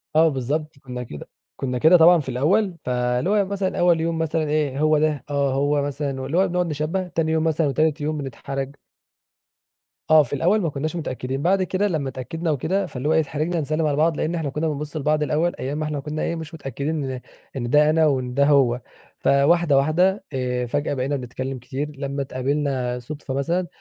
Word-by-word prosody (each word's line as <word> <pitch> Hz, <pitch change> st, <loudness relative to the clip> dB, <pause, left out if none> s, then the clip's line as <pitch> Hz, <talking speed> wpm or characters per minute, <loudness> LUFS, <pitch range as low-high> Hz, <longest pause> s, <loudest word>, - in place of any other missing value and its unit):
آه 160 Hz, +1 st, +6 dB
بالضبط، 150 Hz, +3 st, -3 dB
كنا 125 Hz, -2 st, -6 dB
كده 75 Hz, -11 st, -9 dB, 0.3 s
كنا 125 Hz, -2 st, -2 dB
كده 160 Hz, +7 st, +6 dB
طبعًا 170 Hz, +1 st, +7 dB
في 135 Hz, -3 st, -5 dB
الأول، 175 Hz, -, +1 dB
فاللي 125 Hz, +5 st, 0 dB
هو 210 Hz, -, +3 dB
يوم 200 Hz, -2 st, +2 dB
مثلًا 195 Hz, -2 st, -2 dB
أول 175 Hz, -2 st, +4 dB
يوم 165 Hz, 0 st, -1 dB
مثلًا 160 Hz, 0 st, 0 dB
إيه، 145 Hz, -3 st, 0 dB
هو 155 Hz, 0 st, +4 dB
ده؟ 155 Hz, -2 st, 0 dB
آه 140 Hz, -2 st, +1 dB
هو 145 Hz, +1 st, +1 dB
مثلًا، 140 Hz, -1 st, -3 dB
واللي 140 Hz, +6 st, -2 dB
هو 190 Hz, +1 st, +4 dB
بنقعد 180 Hz, 0 st, 0 dB
نشبّه، 155 Hz, +5 st, -2 dB
تاني 165 Hz, -2 st, -1 dB
يوم 160 Hz, 0 st, +1 dB
مثلًا 160 Hz, -1 st, +1 dB
وتالت 155 Hz, +2 st, +1 dB
يوم 155 Hz, +1 st, -1 dB
بنتحرج. 135 Hz, 0 st, -5 dB, 1.3 s
آه، 155 Hz, -1 st, +7 dB
في 125 Hz, -, -7 dB
الأول 180 Hz, +9 st, +2 dB
ما 165 Hz, -, 0 dB
كناش 150 Hz, +4 st, -3 dB
متأكدين، 135 Hz, -4 st, -3 dB
بعد 190 Hz, +3 st, +2 dB
كده 190 Hz, +2 st, 0 dB
لمّا 150 Hz, -7 st, -1 dB
اتأكدنا 160 Hz, +6 st, -3 dB
وكده 180 Hz, +8 st, 0 dB
فاللي 135 Hz, +4 st, -4 dB
هو -, -, +4 dB
أيه 160 Hz, -, +4 dB
اتحرجنا 155 Hz, +3 st, -1 dB
نسلّم 155 Hz, +2 st, -1 dB
على 145 Hz, -, +1 dB
بعض، 160 Hz, 0 st, +2 dB
لأن 170 Hz, +2 st, -1 dB
إحنا 155 Hz, -4 st, -2 dB
كنا 155 Hz, +3 st, -2 dB
بنبص 150 Hz, 0 st, -4 dB
البعض 150 Hz, 0 st, +1 dB
الأول 155 Hz, +5 st, 0 dB
أيام 140 Hz, +3 st, -3 dB
ما 155 Hz, -, -2 dB
إحنا 150 Hz, -2 st, -3 dB
كنا 150 Hz, +2 st, -4 dB
إيه 170 Hz, -, -1 dB
مش 160 Hz, 0 st, -7 dB
متأكدين 145 Hz, +1 st, -3 dB
إن 130 Hz, -1 st, -4 dB, 0.4 s
إن 120 Hz, -2 st, -3 dB
ده 150 Hz, +3 st, +5 dB
أنا، 160 Hz, 0 st, +4 dB
وإن 130 Hz, -4 st, 0 dB
ده 140 Hz, +2 st, +3 dB
هو 130 Hz, -4 st, +3 dB, 0.4 s
فواحدة 145 Hz, +2 st, +3 dB
واحدة 175 Hz, +8 st, +2 dB
آآ، 125 Hz, -1 st, -1 dB
فجأة 145 Hz, +4 st, -1 dB
بقينا 140 Hz, +2 st, -1 dB
نتكلم 130 Hz, +1 st, -5 dB
كتير 135 Hz, +4 st, -4 dB
لمّا 140 Hz, 0 st, -3 dB
اتقابلنا 130 Hz, -2 st, -1 dB
صدفة 145 Hz, +1 st, -7 dB
مثلًا، 170 Hz, +6 st, 0 dB
150 Hz, 205 wpm, -23 LUFS, 135-160 Hz, 1.3 s, طبعًا